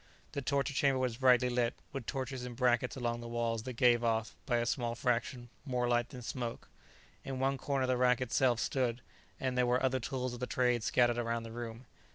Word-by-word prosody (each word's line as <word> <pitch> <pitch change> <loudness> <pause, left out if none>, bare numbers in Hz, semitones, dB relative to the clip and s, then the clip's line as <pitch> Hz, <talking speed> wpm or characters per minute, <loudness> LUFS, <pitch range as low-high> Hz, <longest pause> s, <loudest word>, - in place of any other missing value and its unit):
The 140 - -3
torture 140 0 0
chamber 135 -1 +3
was 125 -3 -1
brightly 125 -1 +5
lit, 120 -1 +1 0.2
with 135 -5 -5
torches 130 -2 -3
in 125 -1 -6
brackets 125 0 +2
along 120 -1 -2
the 120 - -7
walls 115 -1 -1
that 130 +3 -6
gave 120 0 +4
off, 115 -1 0
by 120 -3 +2
a 120 - +1
small 120 0 -1
fraction, 120 0 -1
more 125 -3 -1
light 120 -1 +1
than 125 -2 -9
smoke. 120 -1 -4 0.6
In 135 -1 -4
one 135 +1 0
corner 135 -2 0
the 130 -1 +1
rack 125 -1 +4
itself 125 -1 +2
stood, 125 -3 0 0.4
and 130 -1 -1
there 125 -1 +3
were 125 +2 +2
other 130 0 +2
tools 130 0 -3
of 120 - -7
the 125 - -3
trade 125 -2 +2
scattered 120 +2 +2
around 115 -1 -1
the 115 - -8
room. 115 +1 -7
125 Hz, 210 wpm, -33 LUFS, 120-130 Hz, 0.6 s, brightly